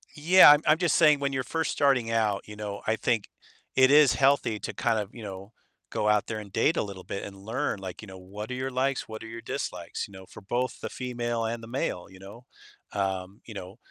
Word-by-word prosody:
Yeah, 165 +1 +8
I'm 150 +1 +5
I'm 155 +1 +5
just 175 -3 +2
saying 150 -3 +5
when 140 -1 -1
you're 130 -1 -1
first 160 +3 -2
starting 130 -5 +2
out, 105 -3 +1
you 105 - -9
know, 105 -1 -6
I 110 - +2
think 115 -2 -1 0.5
it 130 0 +6
is 145 -4 +7
healthy 130 -5 +2
to - - -5
kind 110 - +1
of, 105 -1 -4
you 115 - -10
know, 100 +1 -8 0.4
go 105 - -1
out 105 -1 +2
there 110 -1 -3
and 100 -2 -10
date 160 - +2
a - - +2
little 95 -3 -8
bit 100 - -5
and 100 -1 -8
learn, 110 +3 -3
like, 95 0 -7
you 105 - -10
know, 95 0 -10
what 105 +5 -8
are - - -2
your 130 +1 -3
likes, 130 +1 -1
what 110 0 -8
are - - -8
your 115 +1 -8
dislikes, - - -4
you - - -19
know, 95 -1 -11
for - - -12
both 120 +6 -2
the - - -4
female 120 -2 -3
and 115 0 -3
the - - -9
male, 115 -8 -3
you 95 - -15
know? 105 +6 -12 0.5
Um, 95 0 -3
you 115 - -9
know, 95 -1 -8
115 Hz, 245 wpm, -27 LUFS, 100-130 Hz, 0.5 s, Yeah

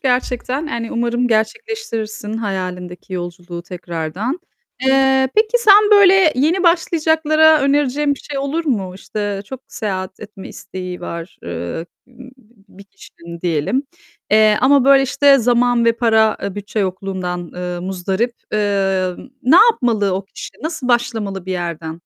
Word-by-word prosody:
gerçekten. 255 +2 -1
Yani 235 -5 -4
umarım 240 +1 0
gerçekleştirirsin 225 - -3
hayalindeki 185 -3 -5
yolculuğu 175 -1 -6
tekrardan. 180 - -4 0.4
Eee, 265 0 +3
peki 435 +3 +3
sen 420 -2 +6
böyle 385 -5 +6
yeni 320 +8 +1
başlayacaklara 315 -2 +3
önereceğin 285 +1 +1
bir - - -14
şey 285 -2 -6
olur 285 +5 -2
mu? 195 - -2
İşte 205 0 -4
çok 260 +4 -9
seyahat 190 -3 -5
etme 205 -2 -10
isteği 180 -1 -8
var, 170 0 -7
eee, 85 - -5 0.2
b 255 0 -14 0.4
bir 200 +1 -14
kişinin 170 -3 -13
diyelim, 175 - 0 0.5
eee, 215 0 +5
ama 270 0 +4
böyle 275 0 +6
işte 275 +1 +4
zaman 240 0 +2
ve 230 - +4
para, 220 -2 +2
eee, 200 - -4
bütçe 205 +1 -5
yokluğundan, 185 -2 -3
eee, 180 0 -4
muzdarip. 190 +5 -2 0.2
Eee, 195 -3 +1 0.3
ne 270 +8 +5
yapmalı 240 - +3
o 190 +1 -3
kişi? 195 - -10
Nasıl 315 -5 -4
başlamalı 220 -6 -1
bir 190 - -2
yerden? 170 -2 -5
220 Hz, 135 wpm, -18 LUFS, 185-275 Hz, 0.5 s, sen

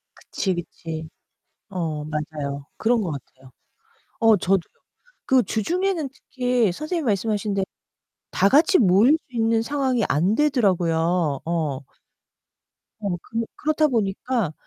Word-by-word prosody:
그치, 190 -2 -2
그치. 165 -2 -6 0.6
어 160 -5 -3
맞아요. 150 -2 -4
그런 235 +1 +2
거 180 - -2
같아요. 130 -1 -11 0.7
어 225 -1 +6
저도요. 195 +1 +2 0.7
그 260 -2 +4
주중에는 340 - -1
특히 250 -8 0
선생님이 310 - -3
말씀하신 210 -1 0
대로 195 -1 0 0.7
다 195 - +3
같이 320 - +5
모일 205 +6 +5 0.2
수 255 - -14
있는 225 0 +2
상황이 260 -2 0
안 175 +9 +2
되더라고요. 175 - +2
어. 160 -5 -1 1.2
어. 200 -4 -2
그 230 0 -3
그렇다 310 0 +2
보니까 225 - -1
205 Hz, 250 characters per minute, -23 LUFS, 165-250 Hz, 1.2 s, 어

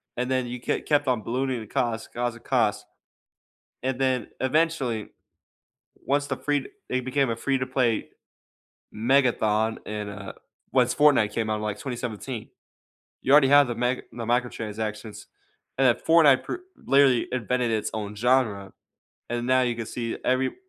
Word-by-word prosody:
and 125 +1 -2
then 130 -1 0
you 125 +1 -5
ke - - -2
kept 145 -1 +2
on 125 -4 +1
ballooning 130 +1 -1
the 110 - -9
cost, 115 +1 -2
'cause 120 0 -2
of 115 - -15
cost, 120 -6 +1 1.0
and 130 0 -2
then, 130 -3 0
eventually, 130 -5 0 0.9
once 145 +1 -1
the - - -3
free 145 -2 -1 0.2
it 130 0 -1
became 135 0 +1
a 115 - -2
free-to-play 130 -2 0 0.8
megathon 110 -3 +2
and, 105 -1 -4
uh, 100 -1 -8 0.4
once 125 -2 +3
Fortnite 145 -8 +4
came 110 0 -2
out 110 - 0
in, - - -6
like, 105 -1 -3
2017, 120 -2 -5 0.7
you 135 - 0
already 145 -1 +7
have 145 -1 +7
the 120 - -3
meg 125 +2 -1
the 115 -1 -6
microtransactions, 110 -3 -3 0.5
and 135 0 +4
then 120 - +4
Fortnite 155 -5 +6
pr - - -4 0.2
literally 135 -3 +3
invented 125 0 0
its 110 -1 -1
own 105 -1 -4
genre, 110 -4 +1 0.6
and 120 0 -2
now 130 0 +4
you 120 -1 0
can 115 -1 -5
see 115 0 -4
every 130 +1 +1
125 Hz, 155 wpm, -25 LUFS, 110-130 Hz, 1.0 s, already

